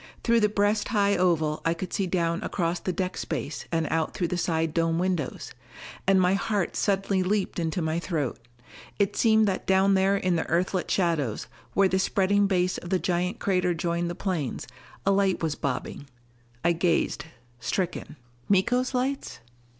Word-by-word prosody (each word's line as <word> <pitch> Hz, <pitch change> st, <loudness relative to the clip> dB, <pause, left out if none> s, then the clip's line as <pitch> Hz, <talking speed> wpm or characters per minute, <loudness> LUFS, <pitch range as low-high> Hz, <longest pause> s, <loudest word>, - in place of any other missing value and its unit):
Through 235 Hz, -1 st, +4 dB
the 210 Hz, -1 st, +3 dB
breast 205 Hz, +1 st, +1 dB
high 200 Hz, -2 st, +2 dB
oval 160 Hz, -4 st, +1 dB
I 165 Hz, +1 st, +1 dB
could 180 Hz, +2 st, -6 dB
see 195 Hz, -, 0 dB
down 170 Hz, -1 st, 0 dB
across 170 Hz, -1 st, -1 dB
the 185 Hz, -, -2 dB
deck 185 Hz, 0 st, -3 dB
space 150 Hz, -1 st, -4 dB
and 165 Hz, -2 st, 0 dB
out 160 Hz, -1 st, 0 dB
through 175 Hz, -3 st, -1 dB
the 180 Hz, -, -1 dB
side 165 Hz, -2 st, 0 dB
dome 165 Hz, 0 st, +1 dB
windows. 180 Hz, -5 st, -2 dB, 0.5 s
And 195 Hz, -1 st, +5 dB
my 180 Hz, 0 st, +3 dB
heart 200 Hz, -2 st, -1 dB
suddenly 195 Hz, -1 st, +1 dB
leaped 190 Hz, 0 st, -1 dB
into 165 Hz, +1 st, -1 dB
my 160 Hz, +1 st, 0 dB
throat. 155 Hz, -9 st, -2 dB, 0.6 s
It 200 Hz, -1 st, +1 dB
seemed 220 Hz, -2 st, +4 dB
that 190 Hz, -1 st, -2 dB
down 190 Hz, +1 st, +4 dB
there 195 Hz, +1 st, +3 dB
in 185 Hz, -3 st, +1 dB
the 160 Hz, -, -1 dB
Earthlit 180 Hz, +2 st, 0 dB
shadows, 160 Hz, -, 0 dB, 0.3 s
where 195 Hz, -1 st, +5 dB
the 190 Hz, 0 st, +1 dB
spreading 200 Hz, +1 st, +2 dB
base 185 Hz, -2 st, +1 dB
of 175 Hz, -, -9 dB
the 190 Hz, -, +2 dB
giant 180 Hz, +3 st, -1 dB
crater 180 Hz, -4 st, +1 dB
joined 170 Hz, +1 st, -1 dB
the 175 Hz, -, -4 dB
plains, 170 Hz, -10 st, -3 dB, 0.4 s
a 195 Hz, -, +4 dB
light 195 Hz, -3 st, +1 dB
was 160 Hz, -2 st, +1 dB
bobbing. 140 Hz, 0 st, -4 dB, 0.6 s
I 170 Hz, -, +5 dB
gazed, 165 Hz, -3 st, 0 dB, 0.3 s
stricken. 170 Hz, +3 st, -3 dB, 0.3 s
Miko's 245 Hz, +7 st, +2 dB
lights? 265 Hz, +2 st, -2 dB
180 Hz, 175 wpm, -26 LUFS, 165-195 Hz, 0.6 s, And